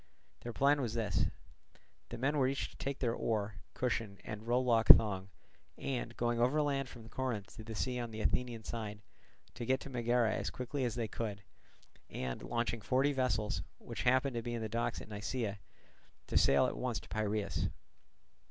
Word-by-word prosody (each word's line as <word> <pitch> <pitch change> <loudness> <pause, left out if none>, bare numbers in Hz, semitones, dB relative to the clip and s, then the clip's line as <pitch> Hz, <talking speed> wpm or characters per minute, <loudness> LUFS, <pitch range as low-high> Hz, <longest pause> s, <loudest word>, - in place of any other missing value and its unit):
Their 120 - -5
plan 140 +4 +3
was 120 -2 -2
as 105 -4 -1
follows: - - +2 0.8
The - - -5
men 140 +5 +1
were 130 - +4
each 135 +1 -1
to - - -17
take 140 0 -2
their 120 -3 +1
oar, 105 -5 -1 0.2
cushion, 115 -5 -1
and 105 +1 -6
rowlock 120 -2 +3
thong, 100 -3 +8 0.5
and, 120 -3 -3
going 120 0 +1
overland 135 +1 +2
from 115 -3 -11
Corinth 115 -4 -3
to 110 - -7
the 110 0 -6
sea 125 +3 -1
on 120 -1 -3
the 110 -1 -5
Athenian 120 0 0
side, 105 -2 -5 0.5
to 120 - -6
get 130 +3 +2
to 140 - -8
Megara 120 -2 +2
as - - -1
quickly 130 +1 -2
as 120 -2 -1
they 115 -2 -1
could, 105 -2 -4 0.7
and 65 -1 -4
launching 120 -1 -1
forty 135 +6 +2
vessels, 110 -8 0 0.2
which - - -6
happened 130 +2 +3
to 120 - -1
be 120 +1 -3
in 115 - -3
the - - -1
docks 115 +2 -1
at - - -9
Nisaea, 105 0 -3 0.7
to - - -6
sail 70 - +6
at - - -1
once - - -1
to - - -14
Piraeus. 105 -1 -1
115 Hz, 185 wpm, -34 LUFS, 110-125 Hz, 0.8 s, thong